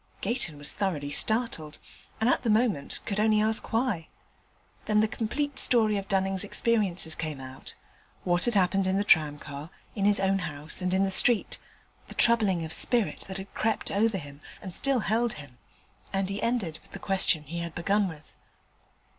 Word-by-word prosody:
Gayton 195 - -1
was 145 0 0
thoroughly 165 -8 -3
startled, 215 -8 0 0.4
and 220 - +1
at 255 - +2
the 235 - -2
moment 215 - 0
could 205 0 -3
only 215 0 +3
ask 220 +1 +1
why. 225 -8 -1 0.8
Then 210 -1 +2
the 215 - +3
complete 270 +6 -2
story 220 -4 +4
of 195 -1 -4
Dunning's 190 -1 +1
experiences 200 -6 +2
came 155 -3 -5
out 130 0 -10 0.5
what 175 0 +1
had 240 -2 0
happened 195 0 +2
in 190 +1 +1
the 200 - +1
tramcar, 150 -4 0 0.2
in 200 -2 -2
his 205 0 +4
own 195 0 +1
house, 150 -2 -4
and 180 0 -1
in 190 +1 +2
the 195 - 0
street, 230 +2 +4 0.5
the - - -11
troubling 205 -8 +3
of 160 - -4
spirit 235 -4 0
that 190 0 -6
had 195 0 -10
crept 220 0 -2
over 215 +1 +1
him, 145 -3 -11 0.2
and 185 -4 -7
still 270 +3 +2
held 230 +2 0
him; 145 -5 -13 0.5
and 195 -1 -1
he 200 - -4
ended 225 -10 -2
with - - -20
the - - -5
question 190 -5 +1
he 165 +4 -6
had 170 -1 -6
begun 200 +4 +1
with. 155 -3 -11
195 Hz, 180 wpm, -27 LUFS, 160-220 Hz, 0.8 s, story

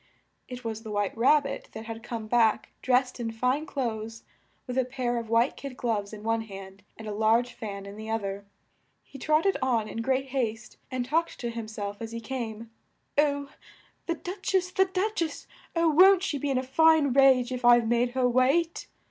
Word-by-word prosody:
It 250 0 -8
was 225 -1 -4
the 220 - -9
White 205 -2 -1
Rab 275 +6 +4
bit 275 - -6
that 220 +1 -7
had 225 0 -7
come 225 -2 -5
back, 225 -1 +2
dressed 255 0 +1
in 235 -1 -2
fine 250 +7 0
clothes, 225 -4 -4 0.4
with 250 - -5
a - - +3
pair 245 -1 -2
of 230 -1 -5
white 230 +3 +3
kid 275 -3 -8
gloves 210 -4 -1
in 215 -1 -9
one 225 0 0
hand, 195 -2 -10 0.2
and 220 - -9
a 210 - -3
large 225 +3 +2
fan 200 -2 -7
in 200 0 -9
the 220 0 -7
oth 225 -1 -1
er. 200 +1 -5 0.6
He 275 - -13
trot 310 +4 +2
ted 390 - +2
on 235 -5 +1
in 225 - -4
great 265 +2 0
haste, 230 -4 -3
and 255 -2 -2
talked 325 +6 -1
to 240 -1 -2
him 230 -1 -6
self 205 -1 -6
as 225 0 -6
he 230 - -4
came, 230 -2 -6 0.4
"Oh! 285 -1 +1 0.6
the 335 - 0
Duch 375 +3 -4
ess, 365 -1 +1
the 380 +1 +3
Duch 385 +2 -1
ess! 315 -3 -3 0.3
Oh! 335 0 +3
won't 375 +4 +6
she 295 -7 -1
be 285 - -2
in 270 - +1
a 255 - 0
fine 305 +1 +4
rage 260 -2 +5
if 250 -1 -4
I've 240 -1 +6
made 240 +1 +1
her 255 -1 +2
wait?" 270 +7 +1
245 Hz, 210 wpm, -27 LUFS, 225-280 Hz, 0.6 s, won't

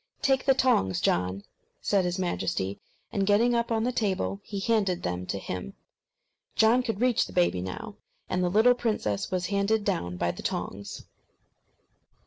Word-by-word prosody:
"Take 270 -1 +2
the 270 -1 +5
tongs, 95 - +2
John," 90 +3 0 0.4
said 195 -3 +1
his 180 +1 -1
Majesty; 100 - -2 0.3
and 200 - 0
getting 210 +5 +3
up 235 0 0
on 225 -1 +1
the 250 - +1
table, 195 -4 -1
he 200 - -5
handed 195 -4 +1
them 90 0 -3
to 100 - -2
him. 90 -7 -6 0.8
John 225 +3 +5
could 225 -4 -3
reach 250 -2 +3
the - - -11
baby 175 - +2
now, 90 0 -6 0.3
and 180 0 0
the 180 - +2
little 220 +6 +5
princess 215 - -1
was 185 -1 -1
handed 200 +2 +2
down 90 +1 -1
by 85 0 0
the - - -9
tongs. 100 +1 -4
195 Hz, 165 wpm, -27 LUFS, -, 0.8 s, the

